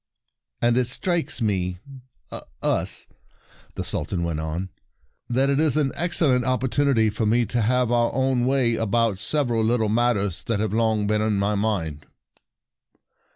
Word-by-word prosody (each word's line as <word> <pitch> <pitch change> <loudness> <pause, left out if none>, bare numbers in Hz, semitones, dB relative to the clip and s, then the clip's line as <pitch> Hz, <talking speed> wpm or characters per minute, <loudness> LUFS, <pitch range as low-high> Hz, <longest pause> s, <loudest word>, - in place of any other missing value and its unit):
" - - -56
And 120 +1 +3
it 125 - +1
strikes 170 -7 0
me— 90 -4 -1 0.9
us," - - +1 0.7
the - - -3
Sultan 85 -3 -2
went 85 -2 -2
on, 80 +4 -4 0.6
"that 130 +3 +2
it 140 - +1
is 155 -3 +2
an 140 -3 +1
excellent 155 -7 +1
opportunity 130 -2 +1
for 110 +1 -1
me 120 +2 +2
to 120 +1 -1
have 125 +2 +1
our 120 -1 +2
own 130 -1 +1
way 130 -3 +2
about 115 -2 0
sev 145 +4 +1
eral 115 -1 +1
little 110 -1 +1
matters 105 -5 +1
that 115 -3 -1
have 105 -1 -1
long 110 -2 +1
been 105 +1 +1
in 110 -1 +1
my 100 +1 +1
mind." 95 -8 -2
115 Hz, 155 wpm, -23 LUFS, 105-125 Hz, 0.9 s, And